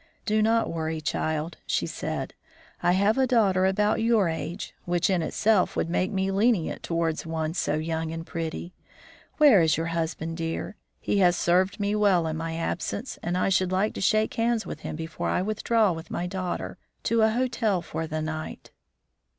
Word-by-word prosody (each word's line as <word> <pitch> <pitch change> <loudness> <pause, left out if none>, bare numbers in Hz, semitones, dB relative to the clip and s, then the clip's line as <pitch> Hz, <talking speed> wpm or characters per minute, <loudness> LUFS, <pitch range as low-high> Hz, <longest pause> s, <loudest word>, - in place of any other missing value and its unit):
"Do 215 -1 +2
not 225 -1 +2
worry, 160 -1 -2
child," 155 +1 -2
she - - 0
said, - - -4 0.5
"I 175 - +3
have 200 +6 +3
a 260 - +3
daughter 195 -6 +3
about 210 +3 +1
your 225 -4 +3
age, 165 +3 -5
which 175 +1 +1
in 180 -2 +2
itself 200 +4 +2
would 165 - -1
make 185 +3 0
me 190 -1 0
lenient 200 -3 +1
towards 165 -2 -1
one 160 -1 -2
so - - 0
young 160 +1 -2
and 165 0 -5
pretty. 165 +1 -5 0.6
Where 280 - +7
is 160 -1 +3
your 165 - -1
husband, 165 0 -3
dear? 165 +5 -3 0.2
He 205 - 0
has 180 -2 +5
served 185 +4 +2
me 205 0 0
well 200 -5 +3
in 160 -1 -2
my 165 0 -3
absence, 175 +8 -3
and 175 +1 -1
I 185 - +2
should 185 -1 +2
like 195 +3 +1
to - - -6
shake 215 +3 +2
hands 230 -1 0
with - - -6
him - - -5
before 160 +1 -4
I 180 - +1
withdraw 215 0 +2
with 165 -1 -6
my 175 - -2
daughter, 180 -1 -4 0.2
to 230 -1 +2
a 220 - +5
hotel 225 -5 0
for 160 +1 -4
the 155 0 -3
night." 155 0 -6
180 Hz, 185 wpm, -26 LUFS, 165-210 Hz, 0.6 s, Where